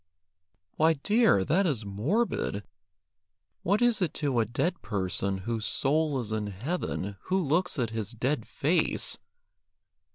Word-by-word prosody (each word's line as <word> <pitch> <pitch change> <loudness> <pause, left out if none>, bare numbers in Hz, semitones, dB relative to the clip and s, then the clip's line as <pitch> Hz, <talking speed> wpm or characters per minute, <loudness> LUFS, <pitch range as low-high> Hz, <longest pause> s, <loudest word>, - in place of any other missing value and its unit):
"Why, 160 +1 +5
dear, 205 - +3
that 185 +5 +3
is 120 -9 -1
morbid. 105 - -1 1.0
What 205 +6 +2
is 240 -3 +3
it 175 -5 0
to 140 -5 0
a 115 - +3
dead 170 - -1
person, 95 -1 -2
whose 115 -2 -2
soul 150 0 +1
is 110 -3 -5
in 110 -1 -1
heaven, 105 - -3
who 190 - +1
looks 175 +1 +1
at 120 -4 0
his 110 -3 -3
dead 125 +2 -1
face? 160 +6 +1
135 Hz, 135 wpm, -28 LUFS, 110-175 Hz, 1.0 s, Why